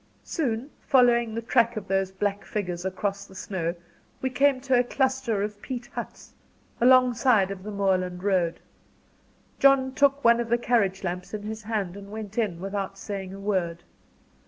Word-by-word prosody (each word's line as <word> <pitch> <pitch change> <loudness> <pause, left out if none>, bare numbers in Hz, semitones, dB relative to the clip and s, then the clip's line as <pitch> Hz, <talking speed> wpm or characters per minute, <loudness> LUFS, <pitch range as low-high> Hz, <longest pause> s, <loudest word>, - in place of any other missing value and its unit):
Soon, 260 -2 -2
following 240 -4 +3
the 230 - -3
track 235 -1 +2
of 200 -2 -5
those 195 0 +1
black 200 +1 -2
figures 180 -4 -4
across 200 +1 -3
the 190 - -15
snow, 175 -3 -3 0.4
we 260 - -2
came 275 +1 +3
to 260 -2 +3
a - - +4
cluster 260 -5 0
of 210 0 -5
peat 250 -2 -5
huts, - - -7 0.5
alongside 245 -5 +5
of 195 -1 -6
the 210 - -7
moorland 185 -3 0
road. 185 -4 +1 1.0
John 275 -1 +4
took 280 0 +3
one 235 0 +6
of 235 -1 -2
the 235 - +3
carriage 210 -6 +1
lamps 180 +3 -4
in 205 - -6
his 220 +1 -5
hand, 205 -4 -3
and 200 0 -10
went 215 0 -5
in, 195 -7 -1
without 195 +1 -4
saying 195 -2 -5
a - - -9
word. 180 -4 -1
210 Hz, 170 wpm, -26 LUFS, 195-245 Hz, 1.0 s, one